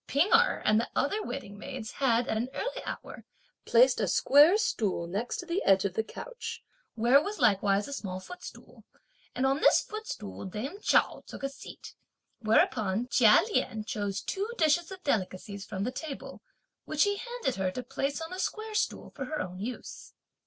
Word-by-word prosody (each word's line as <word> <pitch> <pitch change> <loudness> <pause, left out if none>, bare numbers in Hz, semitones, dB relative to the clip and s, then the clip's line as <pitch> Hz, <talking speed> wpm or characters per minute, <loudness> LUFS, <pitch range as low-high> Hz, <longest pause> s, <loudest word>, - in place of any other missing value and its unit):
P'ing 290 +9 +2
Erh - - +4
and 215 0 +4
the 235 - -2
other 410 +10 +1
waiting 240 - -6
maids 255 -3 -6
had 240 -3 +1
at - - -1
an 235 +4 -1
early - - -3
hour - - -7 0.4
placed 245 +2 +5
a 205 - +1
square 290 - +6
stool 210 - 0
next 200 +8 -3
to 355 - -6
the 345 +3 -1
edge 195 0 +4
of 195 - -1
the 220 - 0
couch, - - -7 0.3
where 240 +5 +5
was 410 +6 -4
likewise 205 -4 +3
a 280 - -6
small 185 -8 -4
footstool, 360 - -11 0.5
and 255 - +1
on 270 +1 +2
this - - +5
footstool 430 - -7
dame 245 - -5
Chao - - +2
took - - -9
a 275 - 0
seat, 275 - -11 0.5
whereupon 220 0 +2
Chia 225 -4 +6
Lien 220 - 0
chose 205 -2 -3
two 400 +3 -3
dishes 325 +1 +3
of 375 -1 -9
delicacies 200 -4 -2
from 195 -2 -3
the 245 - -1
table, 295 0 -7 0.4
which 310 -1 +2
he 405 0 +1
handed 480 - -3
her 190 -1 0
to 250 +7 -5
place 280 +5 -3
on 325 +1 -6
the 370 - -5
square 435 +2 -3
stool 425 - -1
for 275 - -6
her 305 +3 -4
own 185 -7 -5
use. 235 +5 -7
255 Hz, 185 wpm, -29 LUFS, 210-320 Hz, 0.5 s, square